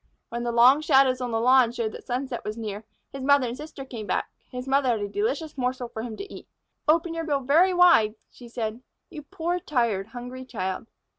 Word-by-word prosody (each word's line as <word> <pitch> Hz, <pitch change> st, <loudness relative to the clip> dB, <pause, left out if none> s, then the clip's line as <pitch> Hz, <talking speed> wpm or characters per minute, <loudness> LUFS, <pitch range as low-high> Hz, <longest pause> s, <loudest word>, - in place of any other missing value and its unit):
When 235 Hz, 0 st, -4 dB
the 240 Hz, 0 st, -1 dB
long 250 Hz, +5 st, +6 dB
shadows 270 Hz, -4 st, +4 dB
on 250 Hz, -, -2 dB
the 225 Hz, -1 st, 0 dB
lawn 250 Hz, 0 st, +5 dB
showed 230 Hz, -3 st, -2 dB
that -, -, -10 dB
sunset 250 Hz, 0 st, -3 dB
was 210 Hz, +1 st, -5 dB
near, 215 Hz, -1 st, -5 dB, 0.3 s
his 275 Hz, -, -6 dB
mother 280 Hz, -1 st, +4 dB
and 235 Hz, -, -4 dB
sister 295 Hz, -1 st, -9 dB
came 230 Hz, -5 st, -7 dB
back. -, -, -1 dB, 0.2 s
His 250 Hz, +1 st, -7 dB
mother 270 Hz, -1 st, +2 dB
had 225 Hz, -3 st, +1 dB
a 205 Hz, -, -2 dB
delicious 370 Hz, -, -2 dB
morsel 250 Hz, -1 st, -2 dB
for 220 Hz, -, -6 dB
him 225 Hz, -2 st, -6 dB
to 400 Hz, -, -8 dB
eat. -, -, -11 dB, 0.4 s
"Open 330 Hz, +2 st, +3 dB
your 330 Hz, 0 st, -3 dB
bill 290 Hz, -3 st, 0 dB
very 320 Hz, +8 st, +4 dB
wide," 345 Hz, -13 st, +5 dB, 0.2 s
she 245 Hz, -, -13 dB
said, 230 Hz, 0 st, -4 dB, 0.3 s
"you 305 Hz, -, -7 dB
poor, 335 Hz, +4 st, -3 dB
tired, 235 Hz, -, 0 dB
hungry 245 Hz, +2 st, -8 dB
child." 195 Hz, -4 st, -4 dB
255 Hz, 215 wpm, -26 LUFS, 230-285 Hz, 0.4 s, long